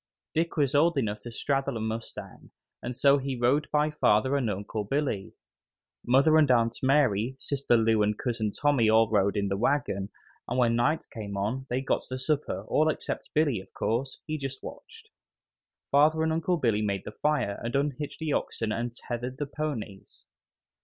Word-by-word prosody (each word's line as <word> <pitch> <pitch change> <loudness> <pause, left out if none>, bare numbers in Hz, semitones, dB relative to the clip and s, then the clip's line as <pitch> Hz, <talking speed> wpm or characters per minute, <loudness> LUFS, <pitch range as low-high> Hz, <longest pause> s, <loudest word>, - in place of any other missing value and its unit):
Dick 165 +1 -1
was 140 -2 +2
old 160 +2 +3
enough 105 -5 -1
to 120 - -9
straddle 135 +1 -1
a - - -4
mustang, 110 +1 -6 0.3
and 125 0 -5
so 140 0 +5
he 135 0 -3
rode 130 +5 +1
by 150 +1 +2
father 130 -1 +2
and 130 -5 0
Uncle 105 +2 -3
Billy. 120 -4 -2 0.7
Mother 140 +6 +4
and 150 -3 +4
Aunt 115 -2 +3
Mary, 130 -4 +2
Sister 135 -3 +1
Lou 110 -1 +3
and 105 0 +1
Cousin 115 -3 -1
Tommy 135 -2 +2
all 110 +1 +5
rode 100 0 +2
in 100 0 0
the 100 - -1
wagon, 105 -5 0 0.4
and 125 - -2
when 120 -2 +3
night 120 +7 +1
came 100 -3 -5
on 120 +7 -2
they 125 +2 0
got 135 - 0
the 130 - -3
supper, 130 -8 -1
all 155 +1 +3
except - - -4
Billy, 145 -8 +2
of 95 0 -14
course; 130 +4 -2
he 155 -1 -3
just 135 -1 -6
watched. - - -11 0.8
Father 155 +3 +4
and 160 0 +1
Uncle 165 +2 0
Billy 115 -8 +1
made 100 -2 -1
the - - -6
fire 130 -7 -1
and 115 +2 -3
unhitched 145 +1 -2
the 155 -3 -2
oxen 110 -1 -2
and 120 +1 -3
tethered 125 +2 -5
the 145 - -2
ponies. 135 -10 -6
125 Hz, 180 wpm, -28 LUFS, 110-145 Hz, 0.8 s, so